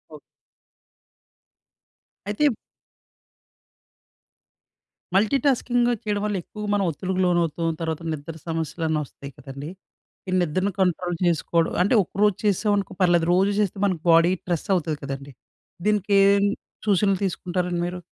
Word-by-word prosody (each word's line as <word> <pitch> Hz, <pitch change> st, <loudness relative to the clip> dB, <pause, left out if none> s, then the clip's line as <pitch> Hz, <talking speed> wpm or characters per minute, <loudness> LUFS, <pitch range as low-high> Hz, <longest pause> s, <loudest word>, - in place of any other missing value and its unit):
Okay. -, -, -11 dB, 2.1 s
అయితే 205 Hz, +5 st, -4 dB
ఇప్ 230 Hz, -, -3 dB, 2.6 s
మల్టీటాస్కింగూ 245 Hz, +2 st, +2 dB
చేయడం 205 Hz, -2 st, -1 dB
వల్ల 210 Hz, -1 st, -1 dB
ఎక్కువగా 210 Hz, -1 st, -7 dB
మనం 200 Hz, -1 st, +2 dB
ఒత్తిడికి 185 Hz, +4 st, -2 dB
లోనవుతాం. 170 Hz, -2 st, +1 dB
తర్వాత 160 Hz, 0 st, -2 dB
నిద్ర 155 Hz, +2 st, -7 dB
సమస్యలన్నీ 160 Hz, -1 st, -1 dB
వస్తాయి 140 Hz, +1 st, -11 dB
కదండీ. 140 Hz, +2 st, -8 dB, 0.6 s
ఈ -, -, -2 dB
నిద్రను 185 Hz, +4 st, 0 dB
కంట్రోల్ 180 Hz, -1 st, +1 dB
చేసుకోవడం 165 Hz, 0 st, +1 dB
అంటే, 205 Hz, -, +1 dB
ఒకరోజు 205 Hz, +2 st, +1 dB
చేసామనుకో 205 Hz, -1 st, +1 dB
పర్లేదు. 175 Hz, -2 st, +4 dB
రోజు 195 Hz, +2 st, +3 dB
చేస్తే 205 Hz, -1 st, 0 dB
మనకి 180 Hz, -5 st, -1 dB
బాడీ 165 Hz, +2 st, +5 dB
స్ట్రెస్ 175 Hz, +2 st, -3 dB
అవుతుంది 160 Hz, -4 st, -1 dB
కదండీ. 140 Hz, 0 st, -6 dB, 0.5 s
దీనికి 210 Hz, -1 st, +1 dB
ఏం 200 Hz, 0 st, +4 dB, 0.4 s
సూచనలు 195 Hz, -1 st, +3 dB
తీసుకుంటారండి 180 Hz, -1 st, -2 dB
మీరు? 180 Hz, 0 st, -5 dB
180 Hz, 115 wpm, -24 LUFS, 165-205 Hz, 2.6 s, బాడీ